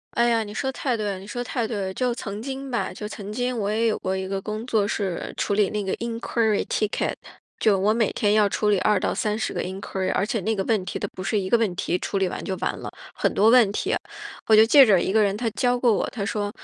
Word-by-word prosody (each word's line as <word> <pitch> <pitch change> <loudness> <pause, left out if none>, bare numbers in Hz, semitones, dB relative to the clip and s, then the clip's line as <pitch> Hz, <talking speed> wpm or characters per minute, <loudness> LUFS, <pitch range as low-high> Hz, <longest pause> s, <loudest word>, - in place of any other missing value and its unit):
哎 235 0 +3
呀， 230 -1 +2
你 205 - -8
说 265 +5 -2
得 - - -1
太 260 -2 -1
对 215 -2 -3
了 195 -2 -3
你 195 - -11
说 245 +3 -4
得 - - -2
太 240 -2 -2
对 225 - -4
了。 190 -2 -3
就 250 +2 -1
曾 205 -3 -6
经 270 +1 -6
吧， 235 - -2
就 210 - -7
曾 210 -1 -7
经 245 +2 -1
我 205 -2 -1
也 220 +2 +1
有 220 - 0
过 190 0 -2
一 190 0 -3
个 195 0 -3
工 215 +3 -5
作 220 -5 +1
是 195 -5 -3
处 - - -1
理 205 -2 +3
那 210 -1 -2
个 190 - -2
inquiry 230 -2 -1
ticket， 215 -1 -1 0.5
就 210 -3 +3
我 200 +3 +2
每 225 -2 +1
天 205 - +1
要 210 -1 +4
处 210 +1 0
理 205 -2 +3
2 210 +2 +3
到 - - 0
30 215 0 -1
个 - - -2
inquiry， 190 0 -4
而 195 - +1
且 225 +1 -1
那 220 +3 -1
个 195 - -1
问 215 -2 +1
题 - - -4
它 - - -3
不 - - -8
是 210 +3 0
一 190 -1 -2
个 235 - +5
问 215 -6 0
题， 175 +1 -1
处 200 - -2
理 190 -1 +1
完 - - -5
就 190 - -2
完 - - -1
了， - - -6 0.2
很 - - 0
多 215 +3 +4
问 240 -4 +6
题。 - - -1 0.5
我 220 - +6
就 215 +1 +8
记 275 +4 +8
着 195 -6 +4
一 190 - -1
个 220 - +4
人 200 -1 +2
他 230 +1 -1
教 245 +3 +1
过 245 -1 +3
我， - - -1
他 205 -5 -4
说 205 0 -2
215 Hz, 355 characters per minute, -24 LUFS, 195-230 Hz, 0.5 s, 就